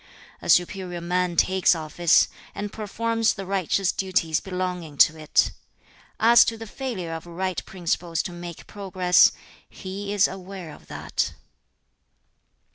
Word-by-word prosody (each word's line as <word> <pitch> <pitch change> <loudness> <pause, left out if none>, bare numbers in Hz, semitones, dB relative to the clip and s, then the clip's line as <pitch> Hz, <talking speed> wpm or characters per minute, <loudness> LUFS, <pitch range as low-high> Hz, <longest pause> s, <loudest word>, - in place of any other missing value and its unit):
A - - -7
superior 180 0 +2
man 180 +1 -1
takes 185 0 +3
office, 160 +1 +3 0.3
and 205 0 -5
performs 225 +1 0
the 195 - -6
righteous 190 0 +1
duties 180 -4 0
belonging 180 -5 -4
to 160 - +6
it. 155 -1 +2 0.7
As 235 +1 +7
to 225 - -2
the 225 - -8
failure 215 -8 -5
of 165 +1 -7
right 185 +1 -3
principles 170 -2 -2
to - - -5
make 175 -1 -9
progress, 185 -3 +3 0.4
he 200 +1 -6
is 205 -1 +4
aware 185 -3 -8
of - - -16
that.' - - -3
185 Hz, 130 wpm, -24 LUFS, 175-195 Hz, 0.7 s, As